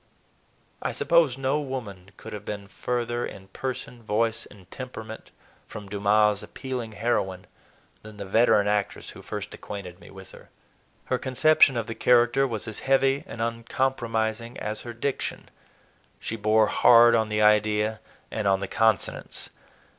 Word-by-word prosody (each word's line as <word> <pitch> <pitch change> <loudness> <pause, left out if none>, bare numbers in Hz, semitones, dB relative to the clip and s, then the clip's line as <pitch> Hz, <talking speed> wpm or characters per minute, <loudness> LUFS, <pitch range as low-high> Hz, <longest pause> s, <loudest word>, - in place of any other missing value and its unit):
I - - -2
suppose 165 -7 +3
no 135 +2 0
woman 110 -9 -6
could - - -9
have 105 -1 -6
been 100 -1 -6
further 120 +4 -2
in 95 0 -8
person, 125 +1 -6
voice, 115 +1 -1
and 100 -3 -16
temperament 110 -4 -8 0.4
from 105 -1 -9
Dumas' 105 +1 +2
appealing 125 -4 -6
heroine 100 -4 -1 0.6
than 105 -1 -12
the 100 - -6
veteran 110 0 +4
actress 105 -1 -1
who - - -12
first 105 -1 -6
acquainted 95 -3 -8
me - - -14
with 95 -1 -12
her. - - -15 0.6
Her 130 - -1
conception 135 0 +4
of 115 - -1
the 115 - -5
character 125 +3 +3
was 115 -2 -5
as 110 - -6
heavy 135 +1 +2
and 115 0 -4
uncompromising 115 -1 -2
as 105 +1 -3
her 120 - -7
diction; 130 +4 -3 0.7
she 115 - -4
bore 110 0 +3
hard 120 +2 +6
on 110 -1 +2
the 105 0 +1
idea 105 +1 +3 0.3
and 110 -2 -2
on 95 -1 +3
the 100 - -4
consonants. 110 +2 -1
110 Hz, 150 wpm, -26 LUFS, 105-120 Hz, 0.7 s, hard